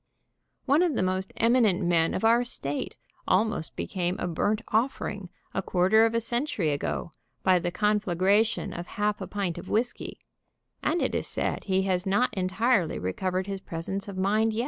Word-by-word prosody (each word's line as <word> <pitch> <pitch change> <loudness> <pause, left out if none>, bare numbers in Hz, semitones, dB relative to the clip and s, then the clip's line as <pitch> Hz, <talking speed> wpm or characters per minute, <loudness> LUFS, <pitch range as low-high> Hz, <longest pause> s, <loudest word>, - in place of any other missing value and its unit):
One 285 +4 +4
of 345 -6 +2
the - - +1
most 185 +1 -1
eminent 225 -6 +3
men 165 -1 +2
of - - -3
our 235 +2 +5
state 145 - -3 0.3
almost 195 -4 +1
became 180 -1 -2
a - - -3
burnt 205 +6 0
offering 215 -5 -1 0.2
a - - 0
quarter 195 +5 +4
of 225 - -3
a - - +3
century 235 - -1
ago, 145 +3 -3 0.3
by 185 -1 +4
the 175 - -2
con 210 +3 +1
flagration 200 +2 +1
of 175 +1 -6
half 210 0 0
a - - -4
pint 195 -5 -3
of - - -10
whisky, 240 +3 -1 0.6
and 335 +3 +1
it - - -1
is - - -1
said - - -2
he 190 -1 +1
has 185 -1 0
not 205 +6 +2
entirely 190 0 +1
recovered 185 - -2
his 195 -1 -5
presence 190 +5 -4
of 200 -2 -7
mind 215 +4 +2
yet. 220 - -2
195 Hz, 180 wpm, -27 LUFS, 180-225 Hz, 0.6 s, our